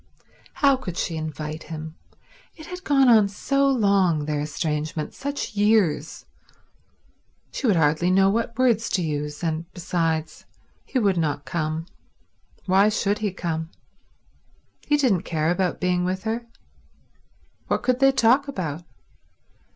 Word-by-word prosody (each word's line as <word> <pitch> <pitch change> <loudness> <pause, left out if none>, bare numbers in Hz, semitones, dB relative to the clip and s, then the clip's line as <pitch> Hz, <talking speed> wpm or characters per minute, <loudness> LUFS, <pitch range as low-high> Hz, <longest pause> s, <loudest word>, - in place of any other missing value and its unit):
How 275 -2 +3
could 180 -9 -7
she 165 - -2
invite 155 0 -5
him? 160 -1 -7 0.6
It 315 - -11
had 360 +1 -8
gone 275 -4 +4
on 220 -4 +6
so 275 +7 0
long, 200 - +2
their 150 -1 -1
estrangement, 150 +1 -3
such 280 -4 -4
years; 205 -8 +1 1.3
she 270 - -2
would 205 - +4
hardly 160 +2 +2
know 190 +1 +4
what 230 +4 -1
words 235 -3 +2
to 185 -3 +1
use; 150 0 -4
and 165 +1 -3
besides, 165 -3 -2 0.4
he - - -3
would 200 -6 +2
not 145 -3 -1
come. 155 0 -2 0.8
Why 195 +2 +4
should 210 -1 0
he 210 -2 -1
come? 165 -3 -4 1.2
He 295 - +3
didn't 240 - +2
care 160 0 -1
about 180 0 -1
being 180 -1 +1
with 185 +1 -2
her. 230 +1 -3 1.2
What - - -1
could 255 0 +1
they 270 0 +6
talk 265 +2 +3
about? 175 - -4
185 Hz, 135 wpm, -24 LUFS, 160-230 Hz, 1.3 s, on